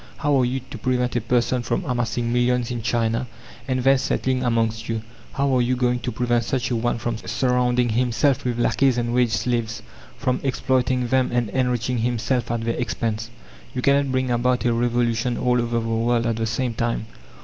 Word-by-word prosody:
How 145 Hz, -1 st, +1 dB
are 125 Hz, -, +3 dB
you 130 Hz, +2 st, -2 dB
to 125 Hz, -, -7 dB
prevent 125 Hz, +1 st, 0 dB
a 120 Hz, -, +1 dB
person 120 Hz, +2 st, +1 dB
from 120 Hz, -, -2 dB
amassing 120 Hz, -2 st, -1 dB
millions 125 Hz, 0 st, +1 dB
in 120 Hz, -1 st, -3 dB
China, 115 Hz, +1 st, 0 dB, 0.4 s
and 130 Hz, -1 st, 0 dB
then 135 Hz, 0 st, +5 dB
settling 130 Hz, 0 st, 0 dB
amongst 115 Hz, -2 st, 0 dB
you? 115 Hz, -1 st, -2 dB, 0.3 s
How 140 Hz, -1 st, +1 dB
are 125 Hz, -, +3 dB
you 125 Hz, +1 st, +1 dB
going 125 Hz, 0 st, +1 dB
to 125 Hz, -, -3 dB
prevent 120 Hz, 0 st, +1 dB
such 125 Hz, +2 st, -2 dB
a -, -, +1 dB
one 120 Hz, +1 st, 0 dB
from 115 Hz, 0 st, -3 dB
surrounding 125 Hz, 0 st, +1 dB
himself 125 Hz, +3 st, +1 dB
with 120 Hz, -2 st, -1 dB
lackeys 125 Hz, +2 st, +2 dB
and 120 Hz, 0 st, -1 dB
wage 125 Hz, -1 st, +3 dB
slaves 115 Hz, 0 st, -1 dB, 0.3 s
from 130 Hz, -1 st, 0 dB
exploiting 130 Hz, -2 st, 0 dB
them 130 Hz, 0 st, +2 dB
and 120 Hz, -3 st, 0 dB
enriching 125 Hz, -1 st, 0 dB
himself 120 Hz, +2 st, 0 dB
at 115 Hz, -1 st, -1 dB
their 115 Hz, 0 st, 0 dB
expense? 115 Hz, -2 st, -2 dB, 0.5 s
"You 125 Hz, -, -2 dB
cannot 140 Hz, -1 st, +3 dB
bring 130 Hz, -1 st, 0 dB
about 120 Hz, -1 st, +1 dB
a 120 Hz, -, +3 dB
revolution 120 Hz, 0 st, 0 dB
all 125 Hz, -1 st, +2 dB
over 120 Hz, 0 st, 0 dB
the 115 Hz, -, -4 dB
world 115 Hz, +1 st, +1 dB
at 115 Hz, -1 st, 0 dB
the 115 Hz, 0 st, -1 dB
same 125 Hz, +1 st, -1 dB
time. 115 Hz, -1 st, -1 dB
120 Hz, 195 wpm, -23 LUFS, 115-125 Hz, 0.5 s, then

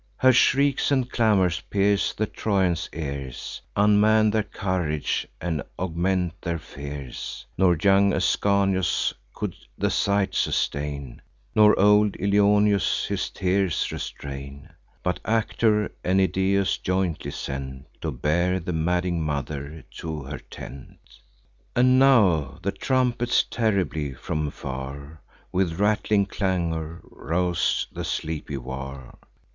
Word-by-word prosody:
Her 130 Hz, 0 st, +5 dB
shrieks 135 Hz, +2 st, +3 dB
and 130 Hz, -3 st, +2 dB
clamours 100 Hz, -8 st, +2 dB
pierce 100 Hz, 0 st, +2 dB
the 110 Hz, -, -1 dB
Trojans' 95 Hz, -6 st, 0 dB
ears, 70 Hz, -5 st, -6 dB
Unman 105 Hz, +1 st, +4 dB
their 110 Hz, +1 st, +2 dB
courage, 90 Hz, -8 st, -2 dB
and 80 Hz, -4 st, -2 dB, 0.2 s
augment 90 Hz, 0 st, -1 dB
their 85 Hz, -1 st, -2 dB
fears; 70 Hz, -4 st, -7 dB
Nor 90 Hz, -2 st, +3 dB
young 100 Hz, +2 st, +4 dB
Ascanius 95 Hz, 0 st, +1 dB, 0.2 s
could -, -, -4 dB, 0.2 s
the -, -, 0 dB
sight 100 Hz, -1 st, +1 dB
sustain, 70 Hz, -2 st, -2 dB, 0.3 s
Nor 105 Hz, -1 st, +5 dB
old 105 Hz, +1 st, +5 dB
Ilioneus 100 Hz, 0 st, +3 dB
his -, -, -2 dB
tears 95 Hz, -1 st, 0 dB
restrain, 70 Hz, +3 st, -7 dB, 0.3 s
But 90 Hz, -, -1 dB
Actor 110 Hz, -1 st, +1 dB
and 95 Hz, +1 st, +2 dB
Idaeus 95 Hz, +1 st, +1 dB
jointly 90 Hz, -3 st, -1 dB
sent, 65 Hz, 0 st, -6 dB, 0.2 s
To 80 Hz, -, -2 dB
bear 85 Hz, +8 st, +1 dB
the 90 Hz, 0 st, -4 dB
madding 90 Hz, +1 st, 0 dB
mother 75 Hz, +1 st, -4 dB
to 80 Hz, -3 st, -5 dB
her 70 Hz, +3 st, -6 dB
tent. 70 Hz, 0 st, -11 dB, 0.8 s
And 130 Hz, +1 st, +5 dB
now 95 Hz, -, +4 dB
the 100 Hz, -, 0 dB
trumpets 125 Hz, 0 st, +1 dB
terribly, 90 Hz, -, -1 dB
from 75 Hz, +3 st, -3 dB
far, 70 Hz, +3 st, -7 dB, 0.3 s
With 90 Hz, -2 st, 0 dB
rattling 105 Hz, -1 st, +2 dB
clangour, 85 Hz, -5 st, -2 dB
rouse 85 Hz, +2 st, -1 dB
the -, -, -5 dB
sleepy 75 Hz, -2 st, -3 dB
war. 65 Hz, 0 st, -7 dB
90 Hz, 115 wpm, -25 LUFS, 75-100 Hz, 0.8 s, Her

